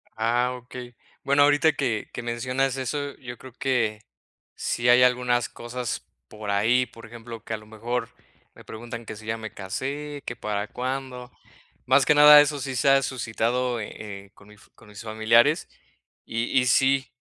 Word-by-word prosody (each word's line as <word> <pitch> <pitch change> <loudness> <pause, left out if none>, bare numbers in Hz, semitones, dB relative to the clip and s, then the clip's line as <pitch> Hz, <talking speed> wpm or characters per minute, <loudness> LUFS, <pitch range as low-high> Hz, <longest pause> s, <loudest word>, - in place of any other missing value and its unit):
Ah 120 +3 +1
okey. 125 0 -10 0.3
Bueno, 140 +1 +4
ahorita 145 +2 +4
que 125 -7 -2
que - - -5
mencionas 125 +3 -1
eso, 140 +2 -3
yo 120 -1 -9
creo 130 -2 -13
que 115 -5 -1 0.5
sí 120 0 -1
hay 125 +1 +7
algunas 125 -1 +2
cosas 120 +1 -5 0.2
por 105 +3 -8
ahí, 115 +5 +3
por 115 -1 -14
ejemplo, 115 0 -10
que 115 - -5
a - - -2
lo 110 - -15
mejor 115 +2 -4 0.5
me - - -14
preguntan 115 +1 -8
que 110 - -7
si 110 +1 -12
ya 110 +1 -1
me 110 -3 -8
casé, 140 +9 -5
que 125 - -4
para 105 -2 -3
cuándo, 130 0 -5 0.5
más 130 +1 +4
que 150 - +4
nada, 150 0 +10
eso 145 0 0
sí 130 0 -4
se 125 +3 +2
ha 135 0 +5
suscitado, 125 0 -1
eh 105 - -7 0.3
eh, 100 - -24
con 100 - -19
mis 105 +1 -17
con 115 - -19
mis 105 -1 -10
familiares 115 +6 +3 0.6
y 115 +1 -2
y 125 - +1
sí, 135 +2 +2
125 Hz, 175 wpm, -25 LUFS, 115-130 Hz, 0.6 s, nada